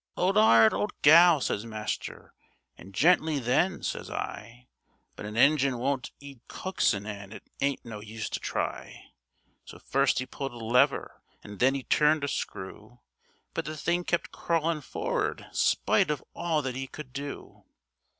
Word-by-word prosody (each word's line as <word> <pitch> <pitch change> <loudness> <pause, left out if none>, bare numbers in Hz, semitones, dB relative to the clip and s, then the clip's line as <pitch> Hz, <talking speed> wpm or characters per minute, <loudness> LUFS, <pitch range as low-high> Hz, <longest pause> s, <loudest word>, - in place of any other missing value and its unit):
''Old 190 +2 +1
'ard, 115 - +6
old 210 - -3
gal!' 165 +1 +8
says 105 - -1
master, 110 -2 -6 0.4
and 95 - -13
'Gently 155 - +3
then!' 140 +9 +1
says - - -4
I, 115 +3 -6 0.5
But 105 - -7
an 105 +1 -7
engine 140 -1 +4
won't 130 +1 -2
'eed 140 -3 -12
coaxin' 110 - -1
an' 100 -2 -7
it - - -10 0.2
ain't 140 -2 -1
no 110 -3 -7
use 110 +1 -6
to - - -2
try; - - -5 0.5
So - - -12
first - - +1
'e 130 - -3
pulled 135 0 -6
a - - -10
lever, 115 +2 +1 0.2
an' 105 -2 -10
then 135 +2 +3
'e 135 - -4
turned 150 +2 +3
a - - 0
screw, 110 0 -6 0.5
But - - -3
the 155 +1 -5
thing 175 +3 0
kept 170 0 -1
crawlin' 165 -2 -1
forrard - - -3
spite - - +2
of 150 -3 -2
all 165 -3 -1
that 130 -2 -3
'e 135 +1 -4
could 130 -2 -10
do. 140 +1 -8
135 Hz, 160 wpm, -28 LUFS, 115-155 Hz, 0.5 s, gal